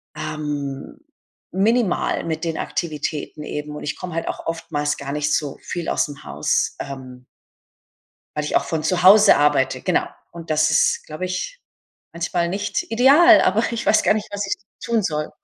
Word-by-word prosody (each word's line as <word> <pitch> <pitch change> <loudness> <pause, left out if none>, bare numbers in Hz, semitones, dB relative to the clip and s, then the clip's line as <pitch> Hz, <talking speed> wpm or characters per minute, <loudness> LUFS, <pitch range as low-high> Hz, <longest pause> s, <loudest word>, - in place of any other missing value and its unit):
ähm, 145 - -5 0.5
minimal 210 +1 +1
mit 160 0 -3
den 165 -1 -2
Aktivitäten 155 -2 -4
eben 150 0 -5
und - - -7
ich 145 - -3
komme 180 -2 -7
halt 165 - -3
auch - - -5
oftmals 150 -3 -2
gar 140 0 -5
nicht 150 0 0
so 145 -3 -1
viel 175 -2 -4
ausm 145 -1 -2
Haus, 70 +2 -1
ähm 130 -2 -8 1.1
weil 150 - -1
ich 150 - -2
auch - - +2
von 160 -2 -2
zu 180 +1 0
Hause 205 +3 +8
arbeite, 145 -2 +2
genau. - - +1 0.2
Und 170 -1 -10
das 155 0 +3
ist, 150 - +2
glaube 155 +4 -5
ich, 185 - -4 0.5
manchmal 170 +1 -1
nicht 205 +3 -2
ideal, 290 +8 +7
aber 210 +5 +2
ich 235 0 -3
weiß 215 - +4
gar - - +4
nicht, 215 -1 -3
was 205 0 -3
ich - - 0 0.3
tun 230 -2 +1
soll. 150 -3 -2
160 Hz, 170 wpm, -21 LUFS, 150-195 Hz, 1.1 s, Hause